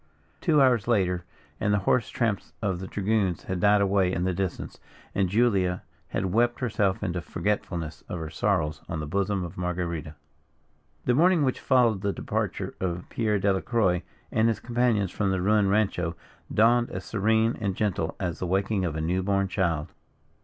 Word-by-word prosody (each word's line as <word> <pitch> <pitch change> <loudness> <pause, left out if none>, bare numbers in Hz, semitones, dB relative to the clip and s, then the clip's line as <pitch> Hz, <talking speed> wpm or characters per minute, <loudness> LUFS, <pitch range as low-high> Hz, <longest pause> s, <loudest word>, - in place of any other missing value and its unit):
Two 160 -4 +3
hours 120 -5 +3
later, 90 -6 +1 0.3
and 105 - +1
the 105 - +3
horse 120 -4 +2
tramps 110 -4 -2
of 95 -5 -1
the 95 - -6
dragoons 100 -3 0
had 95 -1 -3
died 105 +2 +4
away 95 -2 +2
in 90 -1 -1
the 95 0 +1
distance, 95 0 -4 0.3
and 95 -1 +1
Julia 95 -4 +2 0.2
had 95 0 -2
wept 120 +2 +2
herself 105 -4 0
into 90 -3 -2
forgetfulness 85 -4 -3
of 90 - -3
her 80 -2 -5
sorrows 75 0 0
on 80 - -3
the 75 - -3
bosom 100 +4 -1
of 85 - -7
Marguerita. 85 -4 -3 0.9
The 125 - +3
morning 170 +3 +4
which 130 -2 0
followed 120 -7 +3
the 100 0 0
departure - - -3
of 90 -1 -3
Pierre 110 -3 0
Delacroix 95 -1 +1 0.3
and 110 +1 +3
his 115 - 0
companions 120 -5 +1
from 100 +1 0
the 95 -1 0
ruined 100 +1 +3
rancho, 95 -5 +1 0.4
dawned 120 +2 +4
as - - -6
serene 110 +2 +2
and 100 -3 -1
gentle 90 -6 -1
as 85 -4 -3
the 90 - -2
waking 95 +2 0
of 85 -4 -2
a 80 - -2
new 90 +4 0
born 100 0 +1
child. 85 -6 -1
100 Hz, 175 wpm, -26 LUFS, 90-110 Hz, 0.9 s, died